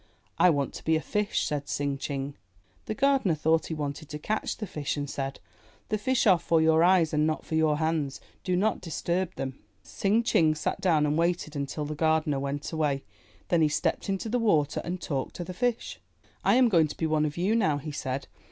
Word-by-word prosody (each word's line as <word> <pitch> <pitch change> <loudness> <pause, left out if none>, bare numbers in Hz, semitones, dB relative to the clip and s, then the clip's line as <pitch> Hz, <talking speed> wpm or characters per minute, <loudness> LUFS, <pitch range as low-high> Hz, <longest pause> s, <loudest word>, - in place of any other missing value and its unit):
'1 180 - +6
want 140 -3 -1
to - - -9
be 160 - +2
a - - +2
fish,'' 210 +5 -1
said 145 -1 -3
Tsing 140 -1 -1
Ching. 140 0 -3 0.5
The 215 - -2
gardener 270 - +2
thought 160 +2 +1
he 160 - -3
wanted 145 0 -5
to 150 - -5
catch 215 +8 -2
the 215 - -4
fish 150 -5 -3
and 145 0 -2
said, 135 -1 -4 0.5
The 215 - 0
fish 260 +4 +1
are 185 -5 +6
for 165 0 +2
your 160 +1 +4
eyes 175 -3 +4
and 150 0 +2
not 155 - -2
for - - -7
your 160 -2 +3
hands. 155 -3 -1 0.2
Do 185 -2 0
not 205 +3 +1
disturb 175 +2 -2
them." 135 0 -5 0.2
Tsing 210 +4 +1
Ching 160 -9 +3
sat 155 - -2
down 160 -5 +3
and 150 +2 +1
waited 170 -2 0
until 145 +2 -3
the 150 - -4
gardener 155 -2 +1
went 140 +1 -3
away. 150 -4 0 0.5
Then 170 -2 +3
he 155 - +4
stepped 150 - -1
into 195 +3 -2
the 245 +3 0
water 155 -10 +2
and 180 +1 -4
talked 140 -6 -3
to 175 - -4
the 180 +2 -7
fish, 240 +4 -2 0.4
"I - - +4
am 255 -1 +6
going 165 -8 +4
to - - -9
be 160 - -1
one 155 -1 +2
of 150 - -7
you 190 +6 +1
now," 160 -10 +2
he 150 +2 -6
said. 130 -1 -3
160 Hz, 220 wpm, -28 LUFS, 145-185 Hz, 0.5 s, 1